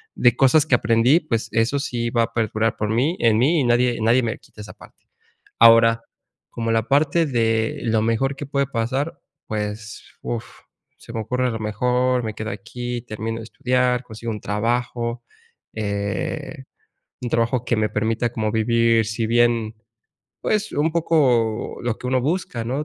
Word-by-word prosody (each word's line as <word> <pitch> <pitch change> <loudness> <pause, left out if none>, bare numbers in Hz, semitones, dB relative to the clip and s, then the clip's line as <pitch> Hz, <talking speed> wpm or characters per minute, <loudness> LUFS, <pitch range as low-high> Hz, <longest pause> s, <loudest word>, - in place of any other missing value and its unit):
de 120 -2 +4
cosas 140 +3 +5
que 135 - 0
aprendí, 115 +7 +3
pues 115 -7 -2
eso 115 +5 +1
sí 120 -3 -2
va 115 -1 +2
a 115 0 -4
perdurar 110 0 0
por 105 -1 -2
mí 130 +10 +1
en 115 -2 +3
mí, 155 +7 +3
y - - +1
nadie 120 0 +2
nadie 120 +3 +3
me 115 -2 -2
quita 105 - -14
esa 105 - -10
parte. - - -18 0.5
Ahora, 115 0 +6 0.5
como 115 -1 -3
la 115 0 0
parte 150 +4 +3
de 115 -4 0
lo 110 -2 +1
mejor 115 +5 0
que 145 - -6
puede 140 0 0
pasar, 130 +5 -2 0.3
pues, 110 +1 -5 0.2
uf, 120 -1 -3 0.5
se - - -12
me 115 - -2
ocurre 125 +4 -1
a - - -1
lo 115 - -4
mejor, 125 +4 +1
me 110 -1 -4
quedo 110 +1 -5
aquí, 120 +4 -5
termino 115 0 -5
de 115 - -8
estudiar, 125 +1 0
consigo 115 0 -7
un 105 - -6
trabajo, 120 +2 -2 0.5
eh, 100 -2 -3 0.6
un 125 - -3
trabajo 115 +1 0
que 120 - +1
me 110 0 +1
permita 110 +2 -1
como 110 -2 -2
vivir, 115 0 +2
si 110 +1 -2
bien, 115 -1 +2 0.7
pues, 210 -1 -1
un 155 +2 0
poco 130 -10 +1
lo 120 -2 -1
que - - -7
uno 130 0 +1
busca, 145 -4 -2
¿no?, 135 +6 -2
115 Hz, 175 wpm, -22 LUFS, 110-125 Hz, 0.7 s, Ahora